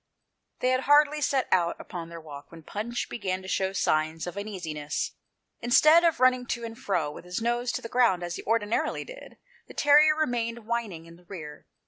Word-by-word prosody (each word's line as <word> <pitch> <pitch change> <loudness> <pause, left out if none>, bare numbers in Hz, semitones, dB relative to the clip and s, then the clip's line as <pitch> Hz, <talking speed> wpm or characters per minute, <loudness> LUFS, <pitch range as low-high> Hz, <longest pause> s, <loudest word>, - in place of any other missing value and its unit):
They 255 - +2
had 255 0 +1
hardly 295 +1 +5
set 275 -2 +1
out 170 -2 +2
upon 170 -2 -7
their 170 0 -8
walk 145 -3 -11
when 165 -1 -12
Punch 225 +8 -4
began 190 -4 -3
to - - -9
show 190 0 0
signs 155 -3 0
of 175 - -6
uneasiness. 175 -8 -4 0.5
Instead 305 +8 +5
of 335 -2 +2
running 255 -1 +3
to 235 0 -3
and 225 -1 -6
fro, 175 -10 -1
with - - -10
his 180 0 -4
nose 240 +1 0
to - - -4
the - - -4
ground, 230 -7 +2
as 175 0 -4
he - - -6
ordinarily 225 0 0
did, - - -12 0.3
the - - -13
terrier 300 +1 +5
remained 235 -6 -2
whining 220 -8 -3
in 165 0 -14
the 175 - -22
rear. 155 -6 -9
215 Hz, 195 wpm, -27 LUFS, 170-250 Hz, 0.5 s, hardly